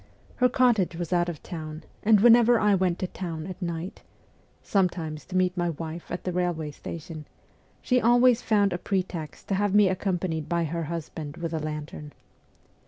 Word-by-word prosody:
Her 250 Hz, 0 st, +4 dB
cottage 235 Hz, -9 st, +2 dB
was 175 Hz, +1 st, -3 dB
out 175 Hz, 0 st, +2 dB
of 165 Hz, -, -7 dB
town, 155 Hz, -3 st, -7 dB, 0.2 s
and 210 Hz, -2 st, +5 dB
whenever 240 Hz, 0 st, +6 dB
I 210 Hz, -1 st, +3 dB
went 185 Hz, -2 st, +1 dB
to -, -, -2 dB
town 165 Hz, -4 st, -5 dB
at 185 Hz, +1 st, -8 dB
night 170 Hz, +1 st, -4 dB, 0.6 s
sometimes 170 Hz, -6 st, -1 dB
to 185 Hz, -, -3 dB
meet 185 Hz, 0 st, +2 dB
my 175 Hz, -1 st, 0 dB
wife 165 Hz, +1 st, -6 dB
at 175 Hz, -, -5 dB
the 180 Hz, -, -2 dB
railway 175 Hz, -4 st, -1 dB
station 155 Hz, +1 st, -8 dB, 0.6 s
she 250 Hz, -1 st, +2 dB
always 240 Hz, +1 st, +5 dB
found 205 Hz, -3 st, +2 dB
a 175 Hz, -, -3 dB
pretext 180 Hz, -6 st, -3 dB
to -, -, +1 dB
have 205 Hz, +1 st, +1 dB
me 205 Hz, -2 st, +6 dB
accompanied 180 Hz, -4 st, -2 dB
by 170 Hz, -1 st, +1 dB
her 165 Hz, +1 st, -3 dB
husband 160 Hz, -1 st, -6 dB
with 170 Hz, -1 st, -4 dB
a 160 Hz, -, -1 dB
lantern. 150 Hz, -1 st, -6 dB
175 Hz, 175 wpm, -26 LUFS, 160-195 Hz, 0.6 s, whenever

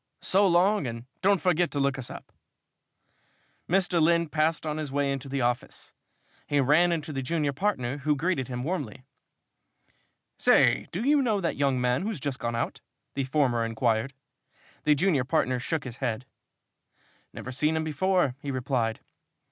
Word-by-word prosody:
So 195 Hz, +1 st, +3 dB
long, 180 Hz, -2 st, +3 dB
and 115 Hz, 0 st, -6 dB, 0.2 s
don't 200 Hz, 0 st, +3 dB
forget 175 Hz, -2 st, +2 dB
to 145 Hz, -, -3 dB
look 140 Hz, -1 st, +1 dB
us 125 Hz, -, -6 dB
up." -, -, -10 dB, 1.4 s
Mr. 180 Hz, -1 st, +2 dB
Lynn 170 Hz, 0 st, +3 dB
passed 160 Hz, +2 st, 0 dB
on 155 Hz, 0 st, -2 dB
his 155 Hz, -3 st, -4 dB
way 140 Hz, 0 st, 0 dB
into 135 Hz, 0 st, -4 dB
the 135 Hz, 0 st, -1 dB
office. 120 Hz, 0 st, -3 dB, 0.5 s
He 145 Hz, -, +1 dB
ran 155 Hz, +6 st, +4 dB
into 155 Hz, -2 st, -3 dB
the 135 Hz, -, -2 dB
junior 150 Hz, +1 st, -1 dB
partner, 140 Hz, -7 st, -1 dB
who 150 Hz, +1 st, +1 dB
greeted 145 Hz, -3 st, -1 dB
him 125 Hz, -1 st, -4 dB
warmly. 140 Hz, -, -4 dB, 1.4 s
"Say, -, -, +4 dB
do 185 Hz, +7 st, -3 dB
you 290 Hz, +2 st, +4 dB
know 220 Hz, -6 st, +1 dB
that 170 Hz, -3 st, -1 dB
young 135 Hz, -2 st, +1 dB
man 125 Hz, +1 st, +1 dB
who's 205 Hz, -3 st, -3 dB
just 140 Hz, -1 st, -3 dB
gone 120 Hz, 0 st, -2 dB
out?" 115 Hz, -, -3 dB, 0.3 s
the 135 Hz, -1 st, -2 dB
former 130 Hz, -4 st, +1 dB
inquired. 115 Hz, +2 st, 0 dB, 0.7 s
The 150 Hz, 0 st, +5 dB
junior 155 Hz, -4 st, +2 dB
partner 125 Hz, 0 st, 0 dB
shook 155 Hz, +4 st, -2 dB
his 125 Hz, -2 st, -8 dB
head. 125 Hz, -1 st, -3 dB, 1.1 s
"Never 130 Hz, -, -7 dB
seen 150 Hz, +5 st, +1 dB
him 160 Hz, -, 0 dB
before," 165 Hz, -1 st, +1 dB
he 145 Hz, -, -6 dB
replied. 125 Hz, -4 st, -1 dB
145 Hz, 165 wpm, -27 LUFS, 130-170 Hz, 1.4 s, The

